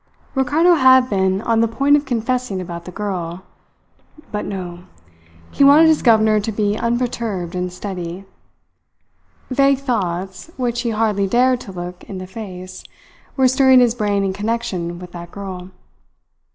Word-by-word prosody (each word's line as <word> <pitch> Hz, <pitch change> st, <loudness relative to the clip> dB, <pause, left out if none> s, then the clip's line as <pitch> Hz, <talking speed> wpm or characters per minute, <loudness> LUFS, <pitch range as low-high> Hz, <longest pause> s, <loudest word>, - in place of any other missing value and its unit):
Ricardo 295 Hz, +7 st, +3 dB
had 260 Hz, -4 st, +5 dB
been 190 Hz, 0 st, +1 dB
on 225 Hz, -1 st, +2 dB
the 230 Hz, -, +3 dB
point 275 Hz, +6 st, +3 dB
of 295 Hz, 0 st, 0 dB
confessing 245 Hz, -3 st, -1 dB
about 170 Hz, -1 st, -7 dB
the 180 Hz, -, -8 dB
girl; 180 Hz, -3 st, -4 dB, 0.9 s
but 210 Hz, -, -3 dB
no! 180 Hz, -3 st, -6 dB, 0.7 s
He -, -, +2 dB
wanted 300 Hz, +4 st, +7 dB
his 315 Hz, -, +3 dB
governor 220 Hz, -2 st, +4 dB
to 210 Hz, +2 st, -3 dB
be 205 Hz, -1 st, 0 dB
unperturbed 230 Hz, -6 st, -2 dB
and 180 Hz, 0 st, -3 dB
steady. 180 Hz, -1 st, -6 dB, 1.3 s
Vague 275 Hz, +1 st, +3 dB
thoughts, 190 Hz, -, -3 dB
which 240 Hz, -2 st, -1 dB
he 240 Hz, -, -2 dB
hardly 215 Hz, -3 st, 0 dB
dared 250 Hz, +4 st, +2 dB
to 200 Hz, -, -10 dB
look 175 Hz, 0 st, -7 dB
in 195 Hz, -, -8 dB
the 185 Hz, -, -6 dB
face, 185 Hz, -3 st, -9 dB, 0.5 s
were 260 Hz, -1 st, +5 dB
stirring 260 Hz, 0 st, +5 dB
his 240 Hz, -2 st, +4 dB
brain 205 Hz, -4 st, 0 dB
in 190 Hz, -1 st, -1 dB
connection 195 Hz, -5 st, -3 dB
with 180 Hz, 0 st, -10 dB
that 170 Hz, -1 st, -9 dB
girl. 185 Hz, -2 st, -8 dB
210 Hz, 150 wpm, -19 LUFS, 185-250 Hz, 1.3 s, wanted